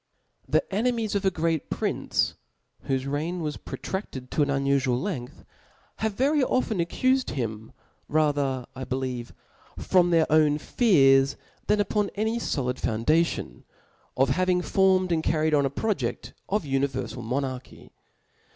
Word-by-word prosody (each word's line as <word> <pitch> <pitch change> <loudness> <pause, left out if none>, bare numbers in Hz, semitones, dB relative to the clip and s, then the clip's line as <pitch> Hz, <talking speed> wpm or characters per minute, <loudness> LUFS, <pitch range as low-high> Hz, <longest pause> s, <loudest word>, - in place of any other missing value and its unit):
I - - -18
^ - - +4
H - - +6
E - - -29
enemies 225 +1 0
of 200 -1 -1
a - - +5
great 165 -3 -1
prince, - - -1 0.5
whofe 135 -1 0
reigrt 150 +6 -2
"*• - - -4
was 150 -3 -3
protraded 135 -10 -6
to - - +1
a» 145 - +3
unufual 140 -3 +1
length, 145 -9 -5 0.5
have 220 -2 -2
very 280 +4 +2
often 250 -6 0
accufed 255 +10 +1
him, 110 -4 -4 0.4
rather^ 145 -4 +1
I 130 - -5
believe, 130 -2 -3 0.5
from 180 -1 +3
their 165 -2 +4
own 150 -1 +4
fearS) 140 - +4 0.3
than 210 0 +3
upon 205 0 +1
any 220 +3 0
folid 130 - -2
foundation, 120 - 0 0.5
of 135 0 +3
hav 185 +7 +1
ing 180 0 +2
formed 190 -1 +3
and 165 -1 +2
carried 155 0 +1
On 140 -2 +3
a - - -3
proje(3: 135 - -2 0.2
of 210 0 0
univerfal 135 -3 -2
monarchy. 130 +1 -4
155 Hz, 150 wpm, -26 LUFS, 130-190 Hz, 0.5 s, H